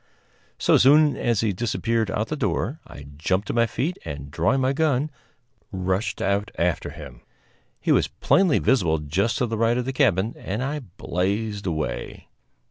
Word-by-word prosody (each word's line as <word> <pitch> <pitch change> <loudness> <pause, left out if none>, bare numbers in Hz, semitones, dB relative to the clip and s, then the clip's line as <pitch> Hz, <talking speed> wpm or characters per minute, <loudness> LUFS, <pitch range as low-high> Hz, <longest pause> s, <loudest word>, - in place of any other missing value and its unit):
So - - +4
soon 150 +3 +5
as 120 -4 0
he 110 - +1
had 95 - -3
disappeared 115 -1 0
out 105 - -1
of 110 - -2
the 155 - -1
door 120 - -1
I 70 - -11
jumped 95 +6 0
to - - 0
my 115 0 +3
feet 155 +10 -2
and, 70 0 -7
drawing 85 - +1
my 130 +1 +2
gun, 150 -1 +1 0.6
rushed 95 +2 -2
out 100 +1 0
after 85 -1 0
him. - - -11 0.6
He - - 0
was - - +3
plainly 185 -6 +2
visible 95 -10 +2
just 80 +9 -1
to 125 - +1
the 115 -2 -3
right 115 +1 +2
of 125 - -1
the 135 - -3
cabin, 105 -2 +2
and 105 +6 -3
I 145 +3 -2
blazed 100 -1 -3
away. 75 -7 -4
110 Hz, 180 wpm, -24 LUFS, 95-130 Hz, 0.6 s, soon